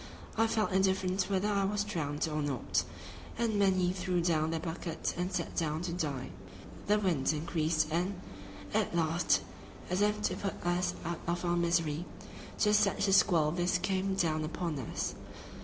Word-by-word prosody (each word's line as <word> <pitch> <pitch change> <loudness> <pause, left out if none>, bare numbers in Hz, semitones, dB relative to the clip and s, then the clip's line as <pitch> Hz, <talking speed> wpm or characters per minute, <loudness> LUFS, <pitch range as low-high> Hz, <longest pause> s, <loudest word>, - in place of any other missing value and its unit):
I 225 +1 +3
felt 220 -2 0
indifferent 190 0 +1
whether 195 +1 +1
I 200 -1 +2
was 205 +1 0
drowned 160 -7 -2
or 155 -1 -2
not, 140 -4 0 0.6
and 225 -3 +1
many 185 -2 +3
threw 180 -1 -1
down 160 -2 +2
their 165 0 -1
buckets 165 0 -3
and 180 +2 -2
sat - - -3
down 160 0 -1
to 175 -1 -3
die. 145 - -3 0.6
The 210 +1 +4
wind 175 -11 +1
increased 155 0 0
and, 180 +3 -1 0.5
at - - +1
last, 165 +1 +2 0.5
as 180 +2 +1
if 210 0 +2
to - - +1
put 195 -3 -4
us 175 +1 +1
out 170 0 -3
of 175 +1 -1
our 175 0 +2
misery, 170 -2 +1 0.5
just 210 -1 +4
such 205 -1 +2
a 195 - +3
squall 165 -6 +4
as 170 - -5
this 175 +1 +2
came 190 +1 0
down 160 -4 +1
upon 165 -1 -3
us. 125 - -3
175 Hz, 175 wpm, -32 LUFS, 160-195 Hz, 0.6 s, The